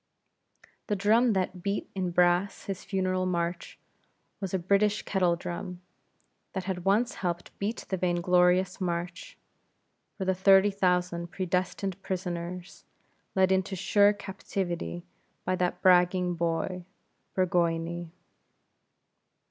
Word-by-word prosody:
The 210 - +1
drum 220 +4 +3
that 185 -1 -1
beat 200 +2 -2
in 185 -2 -1
brass 175 +2 +2
his 195 -2 -5
funeral 185 -1 0
march, 170 -1 -2 0.6
was 195 -3 -4
a 190 - +1
British 200 +4 +2
kettle 180 -3 +2
drum, 175 +1 -6 0.7
that 190 - -3
had 185 -1 -4
once 220 +6 +2
helped 175 -2 -3
beat 210 +3 -3
the 190 - 0
vain 175 -1 0
glorious 180 +2 +3
march, 175 0 -4 0.8
for 190 - -3
the 190 - +2
thirty 195 +2 +5
thousand 180 -3 0
predestined 185 +1 -2
prisoners, 180 -1 -5 0.5
led 190 0 +4
into 190 +1 +1
sure 205 +3 +4
captivity 190 -3 -4 0.4
by 185 - +1
that 180 -1 -1
bragging 180 -1 +4
boy, 170 +2 -2 0.5
Burgoyne. 170 -2 0
185 Hz, 115 wpm, -28 LUFS, 175-195 Hz, 0.8 s, thirty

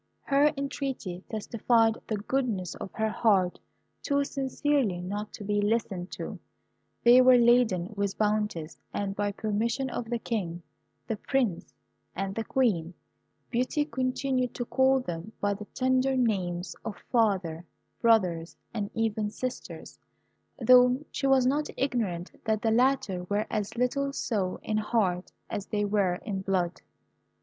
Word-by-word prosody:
Her 285 +2 +4
entreaty 270 -10 -4
testified 225 +1 +2
the 215 - -1
goodness 210 -5 -1
of - - -7
her 220 0 0
heart 195 -6 +2 0.4
too 280 0 +1
sincerely 275 -6 0
not 205 +4 -4
to - - -8
be 205 0 0
listened 205 -4 -1
to. - - -6 0.6
They 245 +2 +8
were 255 0 +7
laden 235 -6 +3
with 200 -1 -1
bounties, 210 -7 -1 0.2
and 195 -1 -2
by 205 0 0
permission 225 +5 -1
of 240 - -3
the 240 - 0
King, 180 -8 -3 0.4
the 225 - -3
Prince, 240 -7 -1 0.4
and 195 +1 -2
the 225 - -2
Queen, 185 -11 0 0.6
Beauty 255 +5 +1
continued 255 -2 -1
to 245 - -3
call 265 +1 +3
them 175 -1 -6
by 205 0 +1
the 210 +1 -7
tender 260 +3 +1
names 190 -7 0
of 220 - -4 0.2
father, 190 -8 +1 0.4
brothers, 180 -8 +2 0.2
and 205 -3 -2
even 220 -2 0
sisters, 250 +4 -6 0.6
though 250 0 +6
she 275 - -1
was 265 -2 +5
not 290 +4 +1
ignorant 215 -10 -1
that 220 -1 0
the 225 - +3
latter 225 -7 +2
were 205 +3 0
as 210 +1 -2
little 275 +3 +1
so 200 -9 -1
in 215 - -1
heart 210 -5 0 0.2
as 200 - -4
they 205 -1 0
were 200 -3 +2
in 200 -4 -2
blood. 180 -3 -1
220 Hz, 140 wpm, -28 LUFS, 195-255 Hz, 0.6 s, They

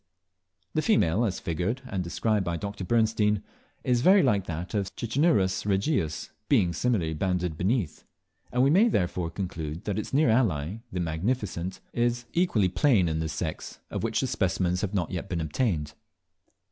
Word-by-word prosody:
The 155 - +1
female, 115 - +3
as 100 - -2
figured 95 +10 -2
and 95 -6 -2
described 105 +4 0
by 85 -1 -2
Dr. 100 +1 -5
Bernstein, 110 -1 +2 0.4
is 125 -1 +2
very 190 +5 +6
like 100 -7 +2
that 85 +4 -5
of 100 -3 0
Cicinnurus 115 - +1
regius, 100 - 0 0.2
being 85 -2 +3
similarly 95 -10 0
banded 90 0 -1
beneath; 95 - -1 0.5
and 125 +1 +2
we 135 - +4
may 200 +8 +6
therefore 90 - 0
conclude 85 -3 -5
that 105 0 -2
its 105 - -5
near 140 -3 +4
ally, 100 - +1
the 90 - -3
"Magnificent," 90 +2 -2
is 120 0 +1
at - - -30
least - - -33
equally 170 - +2
plain 95 +1 +3
in 80 -1 -1
this 80 -1 -2
sex, 80 -1 -4
of - - -2
which - - 0
specimens 90 0 0
have 105 0 -2
not 90 -4 -1
yet 90 +2 -4
been 85 - -1
obtained. 80 - -1
95 Hz, 170 wpm, -27 LUFS, 85-120 Hz, 0.5 s, very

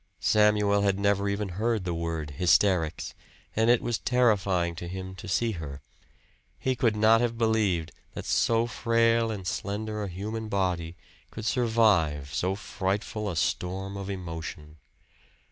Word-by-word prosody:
Samuel 105 -1 +3
had 100 -1 +2
never 100 0 +1
even 100 0 -2
heard 110 +3 -1
the 90 - -1
word 80 -3 -3
hysterics, 90 +1 +2 0.4
and 115 +1 +3
it 120 -1 +4
was 120 -2 -1
terrifying 100 -8 +2
to 85 - -6
him 95 +1 -6
to 100 - -9
see 115 +5 +1
her 75 -7 -6 0.8
he 130 -1 -1
could 115 -3 +1
not 110 +2 +5
have 120 -1 -1
believed 105 -8 +1 0.2
that - - -6
so 115 0 +2
frail 115 0 +2
and 100 -4 -5
slender 105 +3 -3
a 105 - -2
human 110 +5 -5
body 90 -4 -1 0.3
could 110 - -7
survive 100 - +2
so 95 +2 0
frightful 105 +1 -3
a 90 - -4
storm 95 +4 -2
of 100 0 -5
emotion. 80 -4 -6
100 Hz, 145 wpm, -27 LUFS, 90-110 Hz, 0.8 s, not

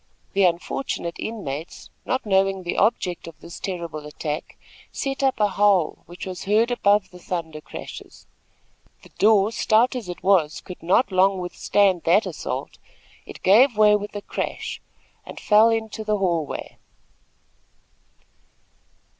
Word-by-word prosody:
The 195 -1 +4
unfortunate 170 +1 -2
inmates, 165 -9 -6
not 260 - -1
knowing 195 -1 +2
the 175 - -3
object 190 -6 0
of 160 -2 -11
this 170 +1 -10
terrible 170 -5 -5
attack, 150 0 -5 0.3
set 270 0 -3
up 270 -3 +1
a 210 - +4
howl 195 -4 +2
which 175 +2 -8
was 185 -1 -6
heard 220 +4 +2
above 205 -4 +2
the 180 - -13
thunder 165 -4 -5
crashes. - - -10 0.8
The - - -16
door, 210 0 +4
stout 230 +3 +2
as 230 -7 -5
it 175 - -7
was, 180 -6 +3
could 180 - -10
not 195 +5 +2
long 190 +1 +3
withstand 185 +1 +1
that 185 +7 +4
assault. - - -5 0.5
It - - -11
gave 225 +5 +5
way 210 -1 +6
with 210 0 -4
a 205 - -5
crash, - - -4 0.4
and - - -10
fell 215 +2 +5
into 220 -1 -2
the 215 -1 0
hall 170 -6 0
way. - - -7
195 Hz, 145 wpm, -23 LUFS, 175-215 Hz, 0.8 s, way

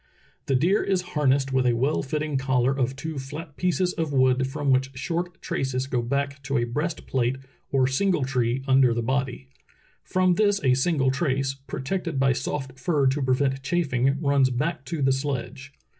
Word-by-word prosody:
"The 135 - +2
deer 175 +10 +3
is 190 -2 0
harnessed 135 -3 +2
with 130 -1 +2
a 120 - +3
well 135 +6 +1
fitting 150 +1 -3
collar 130 -1 +2
of 130 -1 -1
two 155 +1 -5
flat 145 +3 -8
pieces 180 +1 0
of 160 -2 -2
wood 130 -1 +3
from 140 0 -1
which 130 +1 +2
short 175 +5 -3
traces 130 -1 -2
go 125 -2 -1
back 140 +3 -2
to 135 +1 -1
a 120 - +1
breastplate 130 -2 -1 0.4
or 135 -2 +3
single 150 +4 +1
tree 130 -1 0
under 130 -3 +4
the 120 - -1
body. 130 +1 -2 0.5
From 185 -1 +2
this 205 +1 +2
a 130 -2 +4
single 135 0 +2
trace, 135 -1 0
protected 140 +4 -4
by 135 -1 +3
soft 130 0 -4
fur 145 0 +1
to 135 +2 +2
prevent 135 +1 +1
chafing, 140 -4 0
runs 140 -3 +3
back 140 +3 -2
to 160 -3 -3
the 135 - +4
sledge. 135 -1 -3
135 Hz, 175 wpm, -25 LUFS, 130-150 Hz, 0.5 s, under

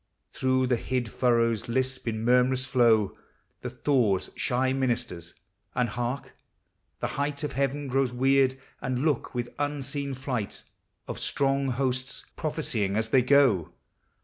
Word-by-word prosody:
Through 130 0 +2
the 125 -1 +2
hid 125 -2 -2
furrows 115 -3 +1
lisp 130 +1 -1
in 110 0 -2
murmurous 125 +1 +3
flow 120 -5 +3 0.5
The - - -4
thaw's 120 -10 +1
shy 130 +1 +1
ministers; 120 -10 -2 0.4
and 125 -1 +1
hark! 120 +4 -4 0.7
The - - 0 0.2
height 145 0 -2
Of 150 - -2
heaven 140 +2 -1
grows 135 -1 +1
weird 135 +1 +3 0.2
and 130 +2 -1
loud 150 -6 +1
with 120 0 -3
unseen 140 -1 -2
flight 125 -5 -4 0.4
Of - - -5
strong 135 0 +1
hosts 130 0 -2
prophesying 120 - -1
as 110 0 0
they 130 +2 +5
go 120 - +4
130 Hz, 135 wpm, -27 LUFS, 120-135 Hz, 0.7 s, they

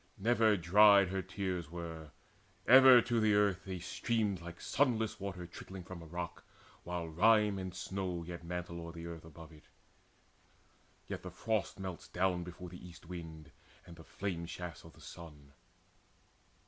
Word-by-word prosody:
Never 110 0 +3
dried 100 +2 +6
Her 95 0 -1
tears 90 -3 -4
were: 80 -2 -7 0.6
ever 130 0 +9
to 120 -2 0
the 110 -2 +3
earth 100 -2 +2
they 95 -1 -4
streamed 100 +1 -1
Like 85 0 -9
sunless 115 -6 0
water 95 -3 -5
trickling 95 +2 -9
from 90 -1 -9
a 85 - -11
rock 85 +1 -6 0.4
While 90 -1 -4
rime 105 +4 +4
and 95 -1 -6
snow 95 -2 -3
yet 85 0 -8
mantle 85 0 -5
o'er 85 0 -8
the 85 -1 -8
earth 85 -1 -8
Above 80 0 -12
it; 75 -1 -17 1.4
yet - - -5
the - - -7
frost 110 -3 -2
melts 95 -3 -6
down 90 -1 0
before 90 +1 -9
The 90 0 -11
east 85 -1 -12
wind 80 -3 -9 0.3
and 85 - -12
the 80 - -13
flame 85 -2 -4
shafts 90 -3 -7
of - - -14
the - - -18
sun. 75 -4 -12
90 Hz, 160 wpm, -34 LUFS, 85-100 Hz, 1.4 s, ever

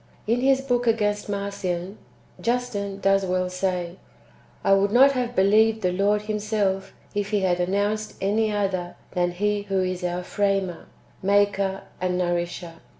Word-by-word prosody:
In 235 +3 +1
his 270 0 +3
book 245 -2 0
against 210 -2 +1
Marcion, 200 -2 -3 0.4
Justin 230 -5 -1
^ - - -14
does 195 0 +4
well 185 0 -1
say: 180 -1 -2 0.3
" - - -29
I 195 - +4
would 195 +1 +3
not 265 +4 +7
have 245 -2 -2
believed 220 +3 +4
the 180 - +2
Lord 205 +3 +1
Himself, 210 -2 -1 0.2
if 205 0 -2
He 205 -2 +1
had 180 -2 +1
announced 205 +4 -1
any 215 +2 +1
other 190 -4 -1 0.2
than 175 -1 +1
He 205 +3 0
who 190 -1 +1
is 185 0 -3
our 180 0 -2
framer, 195 -2 -1 0.3
maker, 200 -1 +2 0.2
and 180 -1 0
nourisher. 175 -1 -2
200 Hz, 155 wpm, -24 LUFS, 185-210 Hz, 0.4 s, not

